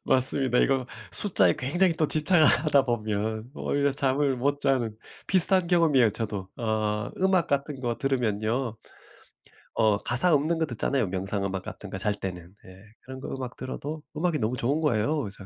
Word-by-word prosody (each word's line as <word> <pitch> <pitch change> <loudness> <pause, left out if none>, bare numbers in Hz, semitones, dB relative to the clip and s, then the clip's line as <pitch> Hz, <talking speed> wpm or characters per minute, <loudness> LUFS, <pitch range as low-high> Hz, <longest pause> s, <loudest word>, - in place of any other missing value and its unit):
맞습니다. 130 -1 +3
이거 135 -2 +1 0.3
숫자에 95 - +5
굉장히 175 +7 +1
또 155 -2 0
집착을 155 +1 +3
하다 140 0 +3
보면 110 0 -3
오히려 140 -1 -1
잠을 140 0 0
못 145 +3 -1
자는 120 -6 -1 0.3
비슷한 185 -1 +6
경험이에요 155 - +3
저도. 100 -3 -5
어 110 -2 -2
음악 185 -3 +2
같은 140 0 -2
거 120 -2 -3
들으면요. 120 -2 -2 1.0
어 110 -2 +3
가사 140 +9 +5
없는 155 +3 +1
거 160 - 0
듣잖아요 130 -1 -2
명상 95 +2 -3
음악 95 -1 -3
같은 105 - -9
거 - - -5
잘 105 +1 -1
때는. 90 -3 -7
예. 95 +1 -15 0.2
그런 130 0 -10
거 - - -8
음악 130 -2 -7
들어도 145 +4 -6
음악이 165 0 -1
너무 120 +2 -2
좋은 140 +7 -1
거예요. 145 +2 0
그래서 100 -4 -8
130 Hz, 350 characters per minute, -26 LUFS, 110-150 Hz, 1.0 s, 비슷한